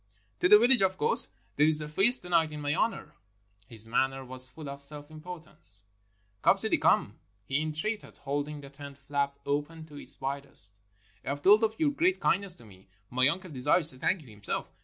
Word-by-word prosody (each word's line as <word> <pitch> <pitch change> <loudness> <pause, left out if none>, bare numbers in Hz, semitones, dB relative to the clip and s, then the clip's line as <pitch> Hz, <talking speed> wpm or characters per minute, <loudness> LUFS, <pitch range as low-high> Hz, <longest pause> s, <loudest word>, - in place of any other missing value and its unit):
"To 180 - +2
the 210 - +9
village, 240 +1 +3
of 190 -1 +1
course. 150 - +5 0.3
There 150 +2 +4
is 155 -1 +3
a 150 - +1
feast 195 +11 +4
to 180 - -10
night 165 -3 +2
in 150 - -7
my 145 0 -1
honor." 150 -4 -2 0.5
His 110 -2 -7
manner 135 +3 -1
was 130 0 +4
full 150 +3 -11
of 140 0 -8
self 145 +1 -2
importance. 155 - 0 0.6
"Come, - - +3
Sidi, - - 0
come," - - +1 0.3
he 140 +6 -1
entreated, 155 +8 -5
holding 145 +1 -5
the 140 -1 -13
tent 140 -1 -12
flap 140 0 -3
open 150 +3 -4
to 150 -2 -14
its - - -14
widest. 135 -7 -4 0.4
"I - - -6
have 145 +1 -5
told 210 +3 +5
of 220 0 -1
your 300 -2 +1
great 360 +6 0
kind 195 - +1
ness 195 -3 -9
to 120 - -17
me. 95 -2 -18 0.2
My 130 +1 +3
uncle 180 +4 -3
desires 150 +4 +4
to 130 - -12
thank 185 +5 -1
you - - -19
himself. 105 -3 -5
150 Hz, 205 wpm, -28 LUFS, 135-180 Hz, 0.6 s, the